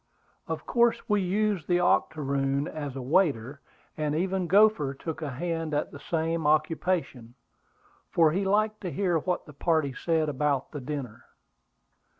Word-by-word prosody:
Of - - -4
course 235 -1 +2
we 210 -3 +2
used 195 -2 0
the 175 -1 +3
octoroon 140 -4 +1
as 145 -4 -5
a 135 - -5
waiter; 140 -3 +1 0.3
and 150 -1 -1
even 185 +2 0
Gopher 190 -7 +4
took 160 +3 -6
a 150 - -3
hand 165 +2 -3
at 145 - -1
the 140 - -10
same 165 -1 -1
occupation, 155 -5 0 0.7
for 165 -2 +4
he 190 +5 0
liked 215 +2 +1
to 185 - -3
hear 180 -3 +1
what 180 +3 -2
the 150 - -13
party 155 -2 0
said 160 +3 0
about 145 -1 -1
the 145 - -6
dinner. 130 -4 -6
160 Hz, 150 wpm, -27 LUFS, 140-180 Hz, 0.7 s, Gopher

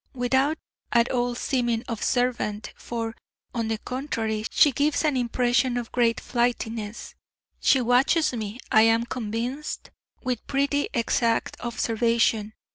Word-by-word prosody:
Without 265 +5 +1 0.3
at 235 0 +3
all 245 -1 0
seeming 240 -2 0
observant 230 -2 -1
for, 230 -1 -4 0.4
on 230 -2 -1
the 225 0 -1
contrary, 225 -4 -3
she 290 - +5
gives 290 +4 +1
an 300 -3 +2
impression 245 0 +1
of 240 -2 -4
great 235 -2 +2
flightiness 235 -3 -2 0.5
she 265 - +4
watches 260 +6 +3
me, 220 0 -5
I 220 - +7
am 225 +1 +4
convinced, 245 +6 -4 0.3
with 250 -3 -3
pretty 280 +1 +1
exact 230 0 +1
observation. 230 -2 +1
240 Hz, 120 wpm, -25 LUFS, 225-255 Hz, 0.5 s, I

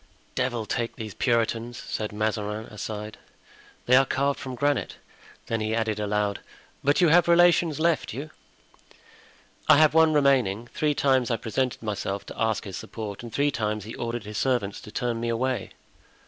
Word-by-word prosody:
"Devil 120 -3 -1
take 115 +2 -2
these 110 -3 -6
Puritans," 115 0 0
said 105 -1 -4
Mazarin 105 0 -2
aside; 105 0 -6 0.7
"they 125 - +5
are 135 - +7
carved 140 +1 0
from 130 -1 -6
granite." 145 +3 0 0.5
Then 115 -1 -2
he 110 +1 0
added 110 -2 -1
aloud, 105 -1 0 0.4
"But 145 +4 +3
you 175 - +6
have 170 +2 +5
relations 170 -2 +4
left 165 0 +1
you?" 145 +7 -6 1.4
"I 155 - +9
have 155 0 +5
one 160 0 +5
remaining. 130 -8 +2
Three 150 -1 +1
times 130 -4 +2
I 115 - +1
presented 115 +3 -2
myself 100 -2 -3
to - - -8
ask 110 -2 +1
his 100 -4 -6
support 105 -3 -6
and 120 -1 -8
three 145 +5 +1
times 105 -4 -2
he 110 +3 -8
ordered 120 -1 -4
his 105 0 -5
servants 120 -7 0
to 105 - -11
turn 120 -1 -2
me 115 0 -2
away." 125 +2 -1
115 Hz, 170 wpm, -26 LUFS, 105-140 Hz, 1.4 s, I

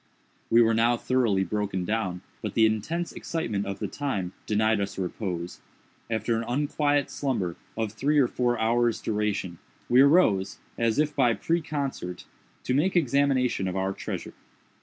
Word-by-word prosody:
We 115 +1 +6
were 115 0 +3
now 115 +2 +3
thoroughly 115 -7 +1
broken 100 -3 -2
down; 95 -4 -2 0.2
but 105 - -5
the 110 - +5
intense 135 +11 -1
excitement 105 -12 -3
of 100 0 -4
the - - -3
time 100 -11 -3
denied 110 0 +2
us 100 - -4
repose. 90 -2 -4 0.5
After 110 +1 0
an 115 - -1
unquiet 145 +2 +1
slumber 100 - -2 0.2
of 110 -2 -1
some 110 - -24
three 150 +2 +2
or 135 -4 +5
four 120 -1 0
hours' 115 +1 +2
duration, 105 -5 -2 0.3
we 125 +2 +6
arose, 140 - +4 0.2
as 115 -2 +1
if 150 0 +1
by 120 -4 +3
preconcert, 140 - -3 0.4
to 125 - -1
make 165 +8 +2
examination 135 - +2
of 90 - -3
our 95 +1 0
treasure. - - -6
115 Hz, 160 wpm, -27 LUFS, 100-135 Hz, 0.5 s, We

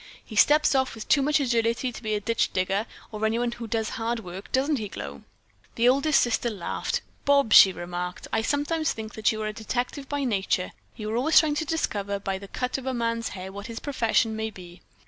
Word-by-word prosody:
He 220 - -10
steps 300 +8 +5
off 265 -2 +1
with 220 - -8
too 280 - +4
much 300 +2 +2
agility 235 -1 +1
to 240 - -9
be 215 -2 -1
a - - 0
ditch 230 +3 0
digger, 195 +4 0 0.2
or 215 0 -5
anyone 235 +2 +1
who 235 -1 -7
does 220 0 -1
hard 230 +1 -2
work, 180 0 -9
doesn't 280 +3 +2
he, 210 - -4
Glow?" 70 - -7 0.5
The 235 +1 +3
oldest 275 +4 +4
sister 240 0 +1
laughed. 200 -6 -3 0.2
"Bobs," 280 -5 +4
she 190 - +10
remarked, 180 0 -5
"I 225 - +2
sometimes 295 +5 0
think 220 -1 -7
that 220 +2 +2
you 215 -1 -4
are - - -1
a 215 - -3
detective 245 +5 -3
by 285 -1 -1
nature. 195 -6 0 0.2
You 215 -1 -5
are 225 - 0
always 310 +6 +6
trying 310 -2 +1
to 300 +2 -1
discover 205 -11 -1
by 195 -1 -3
the 200 - -10
cut 250 +5 -3
of 265 - -9
a 260 - -1
man's 230 -1 -1
hair 185 +1 -7
what 200 +1 -8
his 230 -1 -6
profession 230 -5 +1
may 220 0 -2
be." 180 -4 -13
230 Hz, 225 wpm, -26 LUFS, 205-265 Hz, 0.5 s, she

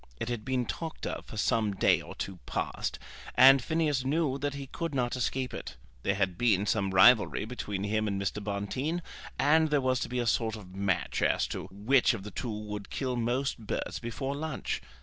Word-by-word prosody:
It 115 - -3
had 120 -3 -3
been 130 -1 0
talked 160 +6 -5
of - - -4
for 110 - -8
some 105 -1 +1
day - - +4
or - - -10
two 95 -2 -5
past, - - -2 0.4
and 135 0 +8
Phineas 155 -4 +1
knew 140 0 0
that 145 0 -2
he 140 -1 -5
could 165 +2 -4
not 125 -2 0
escape 130 +1 -1
it. - - -6 0.3
There 100 - +1
had 95 -3 -1
been 105 -5 +3
some 100 -1 +1
rivalry 105 +3 +5
between 105 -4 -4
him 110 +1 0
and 100 -1 -1
Mr. 100 +1 -2
Bonteen, 130 - -2 0.3
and 160 +2 +4
there 150 -1 +3
was 130 -1 +1
to - - -3
be 125 - -3
a 120 - 0
sort 115 -1 +1
of 95 -4 -11
match 95 -2 0
as - - +2
to - - -5
which 115 +6 +3
of 100 - -7
the 105 - -7
two 115 +7 -4
would 105 -1 -5
kill 130 -2 -2
most 120 +3 -1
birds 110 - -3
before 135 +4 -3
lunch. 155 +2 -3
120 Hz, 205 wpm, -30 LUFS, 105-135 Hz, 0.4 s, and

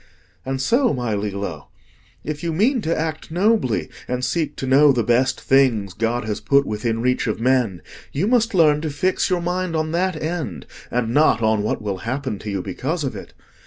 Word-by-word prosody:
And 135 0 -2
so, 240 - +2
my 120 -3 -2
Lillo, 100 -6 -4 0.6
if 150 -1 -4
you 170 -1 -2
mean 235 - +2
to 165 -4 -1
act 155 -1 -3
nobly 180 - +1 0.2
and 125 0 -1
seek 165 -3 -1
to - - -4
know 140 +3 +6
the 120 -3 +1
best 125 +4 +2
things 120 -8 +2
God 115 +4 -1
has 105 -1 -3
put 140 0 +3
within 115 +2 -2
reach 125 0 +1
of 110 - -2
men, 120 -8 +1 0.3
you 155 +8 -1
must 230 -2 +2
learn 150 -4 +4
to 160 - -2
fix 185 +6 0
your 180 -2 +1
mind 180 0 -2
on 155 0 -1
that 175 -1 0
end, 155 - -4 0.2
and 120 -1 -1
not 145 -6 +3
on 110 -1 +2
what 105 +1 -2
will 100 -2 -2
happen 125 0 -3
to 105 - -6
you 100 -2 -2
because 145 - -3
of 135 - -3
it. - - -10
135 Hz, 200 wpm, -21 LUFS, 110-165 Hz, 0.6 s, know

